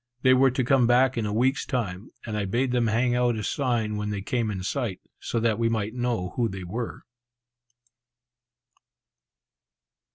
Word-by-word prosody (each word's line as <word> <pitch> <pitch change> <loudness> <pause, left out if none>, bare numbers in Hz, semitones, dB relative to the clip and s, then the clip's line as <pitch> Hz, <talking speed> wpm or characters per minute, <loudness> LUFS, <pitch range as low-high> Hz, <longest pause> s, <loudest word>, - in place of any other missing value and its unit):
They 130 -1 +6
were 130 +1 +5
to 130 +1 -1
come 130 -1 +3
back 125 +2 +4
in 115 -3 -1
a - - -2
week's 130 +6 +1
time, 100 -6 -3 0.2
and 110 -2 -4
I 105 -1 -1
bade 120 +6 0
them 120 -2 +2
hang 120 +3 +2
out 120 -1 +2
a 110 - -4
sign 115 -6 -1
when 105 0 -3
they 100 -2 -3
came 115 0 -1
in 95 -3 -4
sight, 100 -1 -2 0.2
so 115 - -2
that 115 -1 +1
we 115 0 +2
might 110 -1 -1
know 120 -7 -1
who 120 -2 +1
they 95 -1 -6
were. 115 +7 -5
115 Hz, 175 wpm, -26 LUFS, 105-125 Hz, 0.2 s, They